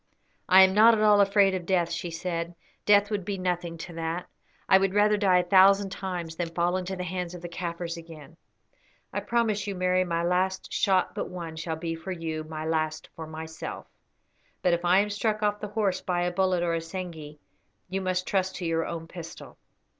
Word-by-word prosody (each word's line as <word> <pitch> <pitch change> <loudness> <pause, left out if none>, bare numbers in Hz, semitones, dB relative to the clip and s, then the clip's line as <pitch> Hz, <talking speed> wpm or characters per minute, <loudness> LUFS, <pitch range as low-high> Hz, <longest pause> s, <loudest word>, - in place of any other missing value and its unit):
"I 190 +1 +9
am 190 0 +4
not 225 +3 +7
at 215 - 0
all 210 -1 +6
afraid 200 -1 +4
of 180 -2 -4
death," 175 -3 +1
she 170 +1 -3
said; 170 0 -4 0.3
"death 205 0 +5
would 205 -2 -1
be 195 +2 -3
nothing 175 -2 -2
to 170 +2 -8
that. 165 +1 -3 0.4
I 190 - +6
would 195 0 0
rather 210 0 +4
die 195 -3 +3
a 180 - +3
thousand 195 +2 +5
times 180 -4 -5
than 175 -2 -2
fall 175 +1 +1
into 185 +1 -3
the 180 - -4
hands 180 0 -4
of 175 - -10
the - - -4
Kaffirs 170 0 -5
again." 160 -3 -12 0.8
"I - - 0
promise 220 -3 0
you, 200 - -3
Mary, 185 0 +2
my 170 -1 -1
last 185 +2 0
shot 190 -2 +2
but - - -4
one 170 -3 -7
shall 160 0 -3
be 165 +1 -4
for 165 +4 -7
you, 160 -3 -4
my 155 0 -6
last 155 -1 -2
for 160 -1 -7
myself; 160 0 -7 0.8
but 180 - +3
if 170 0 -1
I 180 +3 +5
am 210 0 -2
struck 215 +1 -1
off 210 0 +1
the 210 - -5
horse 205 -3 -1
by 175 -1 -1
a 175 - 0
bullet 185 -1 +1
or 170 -1 0
assegai 165 -2 -5 0.5
you 190 +1 -3
must 185 -1 -1
trust 190 -1 0
to 180 - -5
your 165 0 0
own 165 -1 -6
pistol." 170 -1 -10
180 Hz, 205 wpm, -27 LUFS, 165-195 Hz, 0.8 s, I